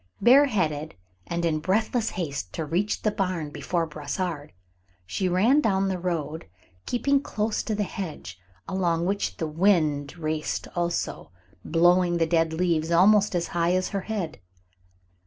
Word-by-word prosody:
Bareheaded, 200 - +3 0.3
and 170 0 -2
in 155 -2 +1
breathless 220 +7 0
haste 140 - -4
to 160 - -3
reach 180 +7 -1
the 215 - +2
barn 185 -7 -2
before 160 +4 -1
Brossard, 150 +1 -4 0.5
she 180 - -1
ran 225 +12 +4
down 195 -5 +1
the 185 -1 -2
road, 160 -3 -3 0.4
keeping 275 +3 +2
close 215 -4 -2
to 215 - -2
the 205 - 0
hedge, 155 - -6 0.3
along 170 -3 0
which 200 +2 -1
the 165 - -2
wind 155 -3 +1
raced 155 -1 -3
also, 175 -1 -2 0.3
blowing 175 +1 +3
the 165 - +2
dead 165 -1 +2
leaves 165 -1 0
almost 195 +4 +4
as 170 -1 -1
high 170 0 +1
as 185 0 0
her 200 -2 -2
head. 190 -7 -4
175 Hz, 145 wpm, -26 LUFS, 160-200 Hz, 0.5 s, ran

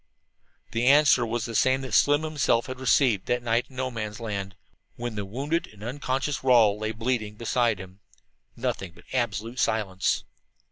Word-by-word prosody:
The 115 +2 0
answer 140 -4 +5
was 115 0 -2
the 115 - -5
same 130 +4 +3
that 130 - -6
Slim 145 +2 +4
himself 150 -7 +1
had 130 0 -7
received 125 -6 +2
that 120 0 0
night 120 +1 +1
in 130 - -17
No 130 0 -2
Man's 110 -2 -5
Land 100 -4 -4 0.4
when 120 -1 -4
the 105 -2 -4
wounded 140 - -2
and 105 -1 -14
unconscious 135 +3 -2
Rawle 115 -5 +5
lay 110 0 -2
bleeding 110 -1 -2
beside 115 -1 0
him 95 +1 -11 0.6
nothing 90 -3 -3
but 85 0 -18
absolute 120 -1 -2
silence. 105 -5 0
120 Hz, 170 wpm, -26 LUFS, 105-130 Hz, 0.6 s, answer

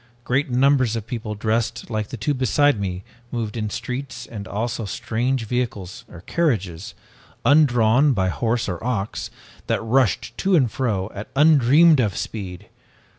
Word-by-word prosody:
Great 135 +4 0
numbers 130 -2 +3
of 110 -2 -4
people, 115 -3 -5
dressed 115 +3 -2
like 110 -1 -2
the 125 - -7
two 115 +7 0
beside 130 0 +2
me, 95 -2 -4 0.3
moved 115 -3 -3
in 110 -2 -2
the - - -7
streets 125 -1 -5
and 100 -4 -8
also 115 +3 -3
strange 115 +4 -2
vehicles 110 -6 -3
or 85 - -11
carriages, 100 - -2 0.5
undrawn 135 -2 +4
by 95 -7 +1
horse 115 +5 -1
or 90 -1 -4
ox, 110 -5 -2 0.4
that - - +1
rushed 120 0 +1
to 195 -1 +2
and 130 -9 +3
fro 105 -7 -2
at 100 +2 -7
undreamed 150 +1 +6
of 105 -7 0
speed! 95 -5 -6
115 Hz, 155 wpm, -22 LUFS, 105-130 Hz, 0.5 s, undreamed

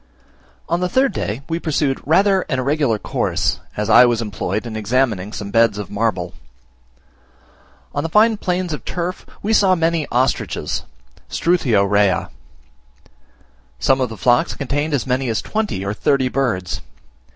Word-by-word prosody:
On 170 +1 0
the 180 0 -1
third 260 +2 +2
day 115 - -3
we 165 0 -2
pursued 145 -4 -1
rather 190 +4 +4
an 130 - 0
irregular 135 -3 +1
course, - - -1 0.2
as 105 0 -1
I 110 - +8
was 120 -2 +2
employed 105 -1 -3
in 115 -2 -6
examining 110 -3 0
some 105 -2 -6
beds 115 -2 +3
of 105 - -6
marble. 100 -5 -1 1.6
On - - -1
the 165 - -3
fine 215 +4 +4
plains 180 -3 -2
of 150 - -6
turf 180 +1 -4 0.2
we 215 +2 +1
saw 195 -3 +4
many 165 -2 0
ostriches 130 +2 -1 0.4
(Struthio 135 - +2
rhea). 100 -1 +2 1.5
Some 135 - +2
of 125 - 0
the 115 - -8
flocks 120 +9 +2
contained 145 +2 -1
as 125 - -2
many 130 0 0
as 110 - 0
twenty 215 - -2
or 100 - -1
thirty 130 +3 +1
birds. 115 -10 -1
130 Hz, 150 wpm, -19 LUFS, 110-170 Hz, 1.6 s, I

